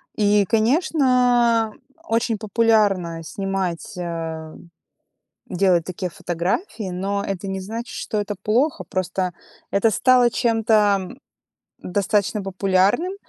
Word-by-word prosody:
И, 205 -1 +3
конечно, 245 - +2 0.3
очень 225 0 0
популярно 205 -6 +1
снимать, 195 0 -3
а, 165 -2 -5 0.9
делать 180 -2 +2
такие 185 0 -4
фотографии, 185 - -3
но 200 +2 -2
это 195 -1 -4
не 190 0 -3
значит, 225 +5 -6
что 215 - -3
это 205 0 -4
плохо, 255 +8 +1
просто 185 -2 -2 0.4
это 200 +3 +3
стало 250 +3 +4
чем-то, 220 -3 +2
м, 185 - -9 0.6
достаточно 200 +2 0
популярным. 195 - +1
200 Hz, 105 wpm, -22 LUFS, 185-230 Hz, 0.9 s, стало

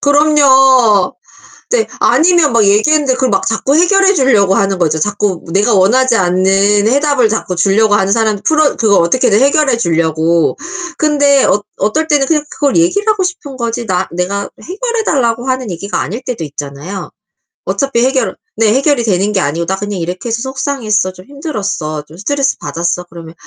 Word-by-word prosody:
그럼요. 270 -7 +3 0.6
네. 475 -2 +1
아니면 335 -4 +3
막 230 -3 +3
얘기했는데 265 +7 +2
그 260 -1 0
막 195 -4 -1
자꾸 230 +5 0
해결해 390 +4 +3
주려고 215 - +2
하는 195 -1 0
거죠. 160 -3 0
자꾸 205 -1 -2
내가 210 +4 +2
원하지 230 +6 +3
않는 195 +3 +2
해답을 275 -3 +2
자꾸 200 -4 -3
주려고 205 +4 +2
하는 195 0 +1
사람 220 -1 +1
풀어 310 -2 +2
그거 215 -3 +2
어떻게든 215 +5 +2
해결해 275 -2 +2
주려고. 165 -3 0 0.4
근데 285 -3 +2
어 205 - +1 0.2
어떨 265 +11 -1
때는 285 -2 +2
그냥 300 -2 +1
그걸 285 -2 -1
얘기를 360 +6 +1
하고 405 -3 +1
싶은 330 -7 -5
거지 235 0 -3
나 185 0 -1
내가 190 +3 -3
해결해 455 +5 -3
달라고 240 -3 0
하는 255 -5 -2
얘기가 200 +4 -4
아닐 230 +7 -5
때도 240 -10 -5
있잖아요. 145 +6 -7 0.5
어차피 270 -4 -1
해결을 265 0 -1 0.2
네, 220 -1 +2
해결이 275 -1 +1
되는 205 -1 0
게 190 - +1
아니고 165 +3 -2
"나 190 - -1
그냥 205 -1 -5
이렇게 180 +7 -5
해서 230 +1 -2
속상했어. 245 -8 -2
좀 185 0 -15
힘들었어. 205 - -5
좀 155 - -15
스트레스 275 +7 -1
받았어." 170 +4 -3
그러면 165 -1 -11
225 Hz, 380 characters per minute, -13 LUFS, 190-280 Hz, 0.6 s, 그럼요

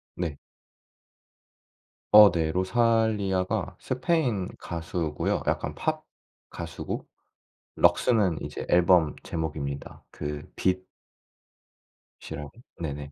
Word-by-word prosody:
네. 85 -5 -3 1.7
어 105 -2 +10
네. 80 -2 0
로살리아가 100 -1 +1
스페인 130 - 0
가수고요. 85 -2 -2
약간 - - -1
팝 - - -2 0.5
가수고 - - -5 0.7
럭스는 105 -9 +3
이제 - - -5
앨범 90 -3 +4
제목입니다. 70 -3 -4
그 75 0 -5
빛 95 0 0 1.4
이라고 75 0 -7 0.3
네네. 70 -2 -5
90 Hz, 185 characters per minute, -27 LUFS, 80-105 Hz, 1.7 s, 어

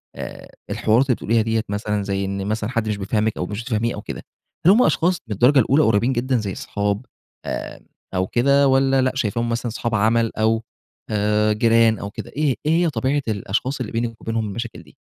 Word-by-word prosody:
آآ، - - -8 0.2
الحوارات 115 +5 +2
اللي 125 -4 +2
بتقوليها 115 +1 +1
ديَّة 110 0 0
مثلًا 105 0 -2
زي 100 0 -2
إن 100 0 -3
مثلًا 110 +1 -2
حد 115 -3 -1
مش 105 - -1
بيفهمِك 105 +2 -1
أو - - -2
مش 105 +4 -5
بتفهميه 115 -1 -1
أو 105 - -6
كده، - - -7 0.4
هل 185 - +8
هم 235 +5 +5
أشخاص 175 +1 +1
من 110 - -3
الدرجة 125 +7 +5
الأولى 140 +6 +4
قريبين 115 +3 +2
جدًا 130 +1 0
زي 100 -4 -3
صحاب 100 +3 -2 0.4
آآ، - - -5 0.3
أو 95 0 +1
كده 140 +5 +3
والَّا 135 0 +3
لأ 130 0 +2
شايفاهم 115 -2 -1
مثلًا 115 +1 -2
صحاب 115 0 -2
عمل، 115 +2 +2
أو 110 +1 +2 0.5
آآ، 105 0 +2
جيران 115 0 +3
أو 100 - -5
كده - - -8
إيه 145 -3 +1
إيه 155 - +2
هي - - +2
طبيعة 135 +2 0
الأشخاص 110 +5 -2
اللي 125 - -4
بينِك 115 0 -3
وبينهم 115 -1 -2
المشاكل 115 +3 -6
دي؟ - - -21
115 Hz, 205 wpm, -21 LUFS, 105-130 Hz, 0.5 s, هل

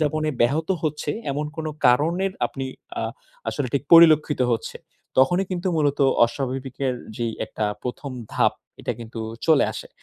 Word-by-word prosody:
যাপনে 155 0 0
ব্যাহত 150 +8 +2
হচ্ছে, 150 -1 -2 0.2
এমন 150 +2 -2
কোন 160 - -3 0.2
কারণের 170 +10 +3
আপনি 135 - -6 0.4
আ - - -2 0.5
আসলে 145 - -2
ঠিক 140 - +1
পরিলক্ষিত 155 -4 +7
হচ্ছে। 115 - -3 0.4
তখনই 175 +8 +4
কিন্তু 185 0 -1
মূলত 145 -2 +1 0.3
অস্বাভাবিকের 130 +1 -3 0.2
যেই 115 -1 -2
একটা 110 - -3 0.2
১ম 130 +2 -5 0.2
ধাপ - - +3 0.3
এটা - - -2
কিন্তু 115 0 -7 0.3
চলে 160 -3 +5
আসে। - - -8
145 Hz, 145 wpm, -23 LUFS, 130-160 Hz, 0.5 s, পরিলক্ষিত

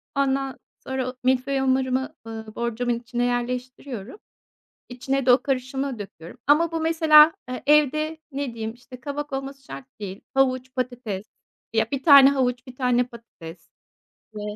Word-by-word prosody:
ondan 270 -1 0 0.3
sonra 265 -1 -2
o 255 - -8
milföy 260 +2 +1
hamurumu, 265 0 +1 0.2
ııı, 220 -1 -8
borcamın 235 0 -1
içine 240 0 -3
yerleştiriyorum 245 - -4 0.7
içine 260 +2 -2
de 250 - +7
o 245 +1 +4
karışımı 265 -1 -2
döküyorum. 195 0 -10
Ama 320 +3 +4
bu 325 - -1
mesela 320 -1 +6 0.3
evde 305 +2 +3
ne 275 -3 -3
diyeyim, 225 0 -5
işte, 250 +1 -13
kabak 290 +2 -5
olması 270 0 -5
şart 135 - -9 0.2
değil. 195 -1 -6
Havuç, 260 -1 +1
patates 245 -6 -3 0.5
ya, 225 -1 +1
1 275 -1 -2
tane 280 -3 +9
havuç, 250 -2 -1
1 255 - -11
tane 250 -1 +2
patates 185 -9 -13 0.7
ve 210 - -5
255 Hz, 145 wpm, -24 LUFS, 240-275 Hz, 0.7 s, tane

